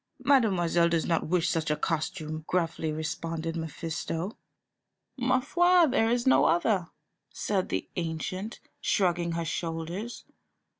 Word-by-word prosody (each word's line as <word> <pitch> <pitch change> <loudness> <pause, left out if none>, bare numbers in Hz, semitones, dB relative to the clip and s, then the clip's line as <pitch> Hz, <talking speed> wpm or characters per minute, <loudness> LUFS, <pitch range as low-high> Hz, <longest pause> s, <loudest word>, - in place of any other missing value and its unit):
"Mademoiselle 185 -11 +3
does 165 -2 +1
not 165 -2 0
wish 175 0 +2
such 160 -2 0
a 150 - +2
costume," 155 0 -3
gruffly 165 -3 0
responded 160 +1 -3
Mephisto. 165 +3 -4 0.8
"Ma 255 0 +2
foi, 350 +5 +4
there 250 -6 +2
is 240 0 +1
no 260 - +5
other," 175 0 +2 0.4
said 195 -3 -1
the - - -2
ancient, 185 +5 -3 0.2
shrugging 175 -3 +1
her 165 0 -2
shoulders. 170 +8 -4
170 Hz, 120 wpm, -28 LUFS, 165-220 Hz, 0.8 s, no